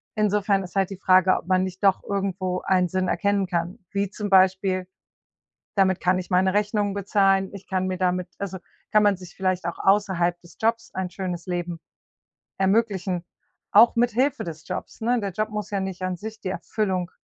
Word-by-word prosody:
Insofern 205 Hz, -2 st, +2 dB
ist 180 Hz, 0 st, -11 dB
halt 195 Hz, -2 st, +2 dB
die 195 Hz, -, -7 dB
Frage, 185 Hz, -1 st, +5 dB
ob -, -, -8 dB
man 185 Hz, 0 st, +3 dB
nicht 185 Hz, +1 st, -6 dB
doch 195 Hz, -2 st, +3 dB
irgendwo 190 Hz, -2 st, -2 dB
einen 185 Hz, -1 st, +2 dB
Sinn 185 Hz, 0 st, 0 dB
erkennen 200 Hz, +2 st, +1 dB
kann, 175 Hz, 0 st, -2 dB
wie 200 Hz, -1 st, -1 dB
zum 205 Hz, +1 st, -5 dB
Beispiel: 190 Hz, -1 st, +3 dB, 0.9 s
Damit 190 Hz, -2 st, +3 dB
kann 185 Hz, +1 st, +2 dB
ich 180 Hz, -, -6 dB
meine 185 Hz, +1 st, +3 dB
Rechnungen 205 Hz, -1 st, +1 dB
bezahlen, 195 Hz, -1 st, +2 dB
ich 195 Hz, -, -10 dB
kann 185 Hz, -1 st, 0 dB
mir 185 Hz, 0 st, -2 dB
damit 180 Hz, -1 st, 0 dB
also 190 Hz, -1 st, -4 dB, 0.3 s
kann 215 Hz, -, +5 dB
man 205 Hz, -1 st, +4 dB
sich 180 Hz, -1 st, -12 dB
vielleicht 185 Hz, -1 st, -1 dB
auch 170 Hz, -, -4 dB
außerhalb 190 Hz, -3 st, +2 dB
des 175 Hz, -1 st, -18 dB
Jobs 230 Hz, +1 st, 0 dB
ein 185 Hz, -1 st, -3 dB
schönes 180 Hz, -3 st, -5 dB
Leben 175 Hz, -2 st, -3 dB, 0.8 s
ermöglichen, 190 Hz, -3 st, +1 dB, 0.5 s
auch 230 Hz, +4 st, +7 dB
mithilfe 245 Hz, +4 st, +1 dB
des 160 Hz, -2 st, -8 dB
Jobs, -, -, -6 dB
ne? 240 Hz, +2 st, +2 dB
Der 200 Hz, -2 st, -3 dB
Job 215 Hz, +4 st, -2 dB
muss 210 Hz, -2 st, -4 dB
ja 200 Hz, -, 0 dB
nicht 190 Hz, -1 st, -4 dB
an 185 Hz, -1 st, -2 dB
sich 220 Hz, +3 st, -8 dB
die 185 Hz, -, -3 dB
Erfüllung 185 Hz, -2 st, -2 dB
190 Hz, 190 wpm, -24 LUFS, 185-205 Hz, 0.9 s, auch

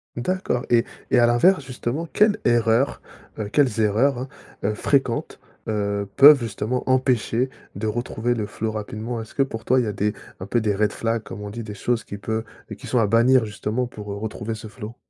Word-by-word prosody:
D'accord, 125 Hz, -1 st, -1 dB
et- 120 Hz, 0 st, +4 dB, 0.3 s
et 125 Hz, -, +5 dB
à 120 Hz, -, +5 dB
l'inverse 145 Hz, +8 st, +4 dB
justement, 130 Hz, +4 st, -4 dB
quelle 210 Hz, 0 st, +4 dB
erreur, 120 Hz, +2 st, +2 dB, 0.4 s
heu, 110 Hz, -2 st, -3 dB
quelles 125 Hz, -1 st, +2 dB
erreurs, 120 Hz, +5 st, +2 dB, 0.4 s
hein, 105 Hz, -, +1 dB
fréquentes, 125 Hz, +1 st, 0 dB, 0.3 s
heu, 100 Hz, -1 st, -1 dB
peuvent 145 Hz, +1 st, +9 dB
justement 115 Hz, +2 st, -2 dB
empêcher 130 Hz, -1 st, +2 dB, 0.3 s
de 100 Hz, +3 st, -4 dB
retrouver 120 Hz, +1 st, -1 dB
le 110 Hz, -3 st, -3 dB
flow 110 Hz, +1 st, -3 dB
rapidement? 110 Hz, +2 st, -4 dB
Est-ce 110 Hz, -, -12 dB
que 135 Hz, -, +3 dB
pour 115 Hz, -4 st, -6 dB
toi, 130 Hz, +1 st, +4 dB
il -, -, +2 dB
y -, -, -3 dB
a 105 Hz, -, -2 dB
des 105 Hz, +1 st, 0 dB, 0.3 s
un 95 Hz, -, -6 dB
peu 120 Hz, +3 st, +1 dB
des 105 Hz, -2 st, 0 dB
red 105 Hz, 0 st, +1 dB
flags 115 Hz, +1 st, -1 dB
comme 105 Hz, -, -9 dB
on 105 Hz, 0 st, -6 dB
dit, 115 Hz, +2 st, -6 dB
des 105 Hz, -1 st, -7 dB
choses 120 Hz, +3 st, -1 dB
qui 100 Hz, -, -7 dB
peut 110 Hz, +2 st, -3 dB, 0.3 s
qui -, -, -11 dB
sont 125 Hz, -, +2 dB
à 115 Hz, -, +4 dB
bannir 115 Hz, +3 st, +4 dB
justement, 110 Hz, +3 st, -2 dB
pour, 105 Hz, -4 st, -8 dB
heu, -, -, -4 dB
retrouver 110 Hz, +1 st, -4 dB
ce 110 Hz, 0 st, -9 dB
flow? 110 Hz, +1 st, -9 dB
115 Hz, 205 wpm, -23 LUFS, 105-125 Hz, 0.4 s, peuvent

